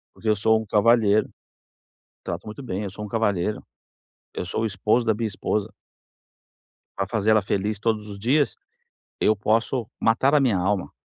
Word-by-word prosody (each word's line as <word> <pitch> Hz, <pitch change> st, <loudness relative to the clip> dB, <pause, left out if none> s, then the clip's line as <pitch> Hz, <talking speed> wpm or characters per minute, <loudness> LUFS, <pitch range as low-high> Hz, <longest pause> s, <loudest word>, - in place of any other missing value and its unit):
Porque 110 Hz, -, -3 dB
eu 105 Hz, -, +4 dB
sou 110 Hz, +2 st, +3 dB
um -, -, -8 dB
cavalheiro. 110 Hz, 0 st, +3 dB, 0.9 s
Trato 85 Hz, +3 st, -5 dB
muito 110 Hz, +6 st, -8 dB
bem, 105 Hz, -4 st, -3 dB
eu 100 Hz, -, -4 dB
sou 105 Hz, +3 st, -8 dB
um -, -, -5 dB
cavalheiro. 105 Hz, -3 st, 0 dB, 0.7 s
Eu 90 Hz, -, -4 dB
sou 100 Hz, -, -2 dB
o 115 Hz, -, +1 dB
esposo 105 Hz, +4 st, +1 dB
da 110 Hz, -, +3 dB
minha 110 Hz, 0 st, -2 dB
esposa. 105 Hz, +1 st, -2 dB, 1.3 s
Para 95 Hz, -, -1 dB
fazer 110 Hz, 0 st, +1 dB
ela 110 Hz, -1 st, +5 dB
feliz 100 Hz, +2 st, -1 dB
todos 105 Hz, -1 st, -1 dB
os 100 Hz, -1 st, -8 dB
dias, 135 Hz, +8 st, +1 dB, 0.7 s
eu 110 Hz, -, +4 dB
posso 110 Hz, +3 st, 0 dB
matar 130 Hz, +6 st, +3 dB
a 150 Hz, -, +5 dB
minha 120 Hz, -8 st, +2 dB
alma, 95 Hz, +1 st, 0 dB
110 Hz, 175 wpm, -24 LUFS, 100-115 Hz, 1.3 s, ela